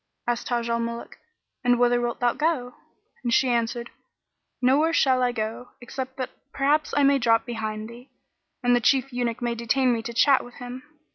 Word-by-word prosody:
Asked 240 -1 -2
Taj 235 -1 -1
al 235 0 0
Muluk, 235 0 -5 0.4
"And 245 -1 +4
whither 245 0 +3
wilt 240 0 -3
thou 240 -1 +3
go?"; 295 -6 -1 0.5
and 240 - -1
she 260 +2 +3
answered, 235 0 -1 0.7
"Nowhere 285 +6 +3
shall 260 -5 +3
I 250 -1 +2
go 225 +1 -5
except 260 +1 -6
that 255 -2 -4 0.2
perhaps 290 +3 +1
I 290 - +4
may 275 0 +4
drop 230 -2 +3
behind 220 -2 -4
thee, 240 +3 -13 0.5
and 245 0 +4
the 245 - +2
Chief 265 +2 +2
Eunuch 245 0 -2
may 240 -1 0
detain 245 +2 +1
me 230 - -1
to 235 - -6
chat 265 +3 +4
with 245 - -13
him." 245 +1 -8
245 Hz, 190 wpm, -25 LUFS, 235-260 Hz, 0.7 s, And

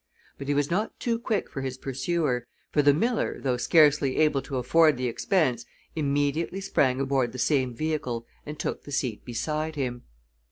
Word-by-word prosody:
But 140 - -6
he 145 - +1
was 145 +2 +1
not 210 +6 -1
too 230 -1 0
quick 225 -3 -1
for 135 - -6
his 130 -1 -4
pursuer, 135 -1 -1 0.2
for 150 - +3
the 145 0 +6
miller, 230 - 0
though 130 -2 0
scarcely 145 -1 +4
able 150 -3 +3
to 135 0 -5
afford 155 +3 +4
the 130 - -2
expense, 125 - +1 0.3
immediately 145 +4 0
sprang 130 -9 +1
aboard 135 -3 0
the - - -6
same 130 -2 +1
vehicle 125 -5 -2 0.2
and 150 +1 -7
took - - -3
the 145 - -11
seat 125 -6 -2
beside 155 +6 -3
him. 125 -4 -3
140 Hz, 175 wpm, -27 LUFS, 130-155 Hz, 0.3 s, the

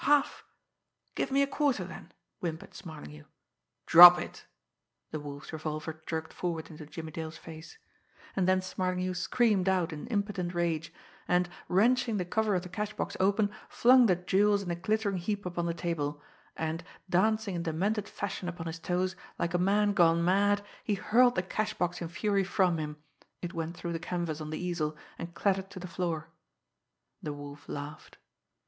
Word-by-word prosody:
"Half 290 -1 +3 0.7
give - - -1
me 275 +1 +3
a - - +3
quarter 280 -8 +1
then?" 185 - -10 0.3
whimpered 160 -2 -5
Smarlinghue. 75 - -10 0.6
"Drop 175 +1 +11
it!" - - -7 0.6
The 155 - -3
Wolf's 145 +1 -8
revolver 155 0 -4
jerked 160 -1 -3
forward 165 -3 -3
into 155 -1 -10
Jimmie 160 0 -7
Dale's 160 +1 -6
face. 160 - -11 0.6
And 185 -2 +1
then 185 0 +3
Smarlinghue 185 0 -1
screamed 195 0 +2
out 180 -4 +1
in 150 +8 -7
impotent 200 -5 -2
rage, 165 -2 -1 0.4
and, 180 0 +3 0.2
wrenching 230 +4 +3
the 180 - -1
cover 215 +2 +1
of 180 - 0
the - - -7
cash 210 +3 -4
box - - -3
open, 200 +2 +3 0.2
flung 250 0 +6
the 185 - +4
jewels 200 +3 +2
in 175 - -3
a - - 0
glittering 205 +2 0
heap 200 +3 -3
upon 175 -1 -2
the 170 - 0
table 150 -4 -2 0.4
and, 160 +1 -2 0.2
dancing 215 +3 +2
in 170 - -2
demented 195 +6 -1
fashion 195 -3 -4
upon 175 -1 -6
his 165 0 -5
toes, 185 +2 -1 0.2
like 170 0 -1
a 175 - +2
man 205 +3 +3
gone 170 -2 +4
mad, 205 +2 +3 0.2
he 210 - 0
hurled 245 +5 +4
the 180 - +1
cash 215 +3 -2
box 175 0 -1
in 170 - -2
fury 200 +3 0
from 185 -3 +2
him. 150 -1 -4 0.5
It 175 +1 -4
went 165 0 -4
through 170 -1 -4
the 165 - -2
canvas 170 -3 -3
on 155 - -5
the 155 - -3
easel, 170 -4 -2 0.2
and 170 0 -7
clattered 195 0 0
to 195 - -9
the 180 - -7
floor. 170 -3 -3 0.9
The 150 - -4
Wolf 145 0 -10
laughed. 145 +2 -7
180 Hz, 175 wpm, -30 LUFS, 165-200 Hz, 0.9 s, Drop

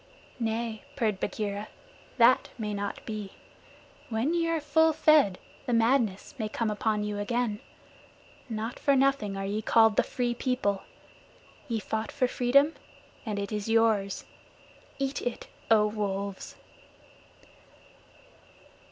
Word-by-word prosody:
"Nay," 225 -1 -2
purred 215 -7 0
Bagheera, 205 0 -3 0.5
"that 240 +1 +5
may 210 -2 -3
not 200 0 -4
be. 210 -3 -5 0.8
When 235 +8 0
ye 335 -1 +1
are 330 -1 +1
full 320 +2 +3
fed, 300 -11 +4 0.3
the 245 - 0
madness 230 -4 +2
may 215 -1 -2
come 220 0 -1
upon 210 0 0
you 210 -1 -3
again. 225 0 -1 0.9
Not 225 +1 -4
for 280 -1 +3
nothing 265 -7 +2
are 195 - -3
ye 205 +2 -2
called 225 0 +4
the - - +7
Free 245 -1 -1
People. 240 -5 -1 0.9
Ye 230 -4 -1
fought 220 +1 -3
for 260 -3 +1
freedom, 280 +5 +3 0.5
and 210 -2 -2
it 200 +1 -3
is 210 0 -3
yours. 220 -3 +2 0.7
Eat 275 0 -2
it, 245 - -4 0.2
O 215 -2 +6
Wolves." 200 -2 -3
225 Hz, 125 wpm, -28 LUFS, 210-250 Hz, 0.9 s, the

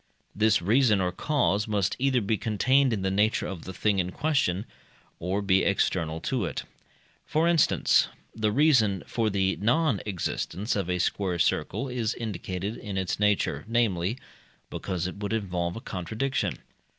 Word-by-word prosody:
This 105 -3 +3
reason 110 +1 +4
or 90 -1 0
cause 105 - 0
must 100 -4 0
either 130 -2 +2
be 110 +2 +1
contained 130 +5 +2
in 105 -4 -1
the 95 - 0
nature 105 +3 +2
of 90 -4 -6
the 95 - -6
thing 100 +2 +1
in 90 0 -1
question, 135 - 0 0.5
or 95 +4 -1
be 95 -1 +3
external 80 -4 0
to - - -1
it. - - -3 0.6
For 160 +2 +1
instance, 170 -3 +3 0.3
the 110 -1 0
reason 115 - +3
for 115 -2 0
the 95 -1 0
non 120 +2 +2
existence 100 +2 -2
of 95 -3 -2
a 90 - +1
square 90 0 0
circle 135 +9 0
is 120 -4 -2
indicated 100 -2 -4
in 100 -2 -5
its 95 0 -2
nature, 105 -1 +1
namely, 110 -3 +1 0.5
because 90 -3 -3
it 90 - -4
would 105 +1 -3
involve 90 -5 -2
a 115 - -6
contradiction. 110 +9 -2
105 Hz, 160 wpm, -27 LUFS, 95-115 Hz, 0.6 s, reason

